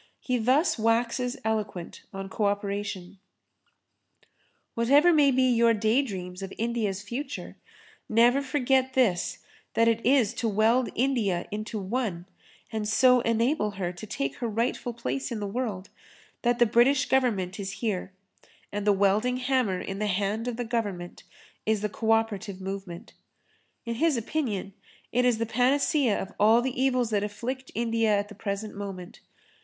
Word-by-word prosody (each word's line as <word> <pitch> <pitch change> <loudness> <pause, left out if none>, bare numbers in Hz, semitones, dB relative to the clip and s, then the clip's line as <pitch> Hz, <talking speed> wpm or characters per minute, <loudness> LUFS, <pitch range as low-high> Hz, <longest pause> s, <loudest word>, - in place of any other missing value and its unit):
He 250 -2 -1
thus 260 +5 +2
waxes 235 +3 +1
eloquent 210 -6 -3
on 195 0 -6
co 205 +2 -2
operation: 200 -2 -3 1.5
"Whatever 285 +9 +5
may 295 -3 +5
be 260 -1 +3
your 235 -2 +4
daydreams 205 -5 -1
of 195 0 -6
India's 220 -4 -1
future, 240 +8 -6 0.5
never 240 +5 +4
forget 265 -1 +1
this 220 -10 +1 0.3
that 230 0 +4
it 230 0 +1
is 255 -4 +3
to 235 - +1
weld 225 +4 +2
India 230 -9 0
into 215 +1 -4
one, 195 -3 -2 0.5
and 215 -2 -2
so 250 +2 +5
enable 230 0 +1
her 180 -2 -2
to 180 +5 -9
take 135 -7 -3
her 240 - -2
rightful 230 +2 -1
place 255 +3 -3
in 230 - -3
the 205 - -3
world, 205 -3 -3 0.5
that 240 0 +2
the 240 - +5
British 250 +5 +3
Government 225 -7 +1
is 195 -1 -4
here; 200 -3 -3 0.6
and 205 0 -3
the 205 - +6
welding 205 +6 +2
hammer 250 -7 0
in 195 0 -5
the 210 - 0
hand 205 +4 -1
of 240 -2 -3
the 245 - -3
Government 205 -7 -3 0.4
is 215 -1 +1
the 210 - -1
co 220 +3 -4
operative 215 -3 +1
movement." 190 -2 -7 0.7
In 235 - -2
his 305 +3 +2
opinion 225 -6 -2 0.4
it 250 +1 +2
is 245 -3 +3
the 230 - -1
panacea 255 +1 +2
of 195 - -6
all 225 +3 +5
the 260 0 -2
evils 250 -3 +1
that 205 -1 +1
afflict 245 +5 -5
India 230 -1 +1
at 205 0 -2
the - - -9
present 205 +1 -4
moment. 195 -2 -7
225 Hz, 155 wpm, -27 LUFS, 200-250 Hz, 1.5 s, the